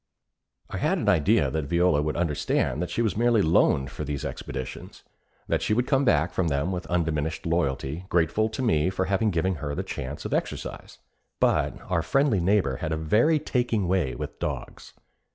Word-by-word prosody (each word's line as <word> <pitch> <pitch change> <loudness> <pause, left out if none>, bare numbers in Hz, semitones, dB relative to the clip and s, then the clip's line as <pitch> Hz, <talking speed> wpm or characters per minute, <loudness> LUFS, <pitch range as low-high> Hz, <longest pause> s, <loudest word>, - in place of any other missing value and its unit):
I - - -3
had - - +1
an - - -3
idea 75 - +3
that 80 -2 -2
Viola 85 -1 +2
would 75 0 -2
understand 75 -3 0
that 90 - -2
she 120 - 0
was 110 - 0
merely 115 -1 +3
loaned 70 -4 +3
for - - -5
these 70 -1 -4
expeditions; 65 -1 -7 0.4
that - - 0
she 105 - +1
would 125 +2 +1
come 135 0 +2
back 80 - +2
from 90 -2 0
them 70 +4 0
with 90 -1 -4
undiminished 80 -2 -1
loyalty, 80 -1 -1
grateful 90 +6 +2
to 130 +4 -4
me 90 -8 +2
for 95 0 -1
having 100 +3 +1
given 90 0 0
her 75 - -3
a 70 - -2
chance 70 +3 -6
for - - -1
exercise. - - -4 0.4
But - - +1
our 85 -2 0
friendly 130 - +2
neighbor 100 +3 +2
had 80 -3 -4
a 80 - 0
very 110 - +3
taking 120 -9 0
way 85 -9 0
with - - -7
dogs. - - -5
85 Hz, 190 wpm, -26 LUFS, 75-105 Hz, 0.4 s, idea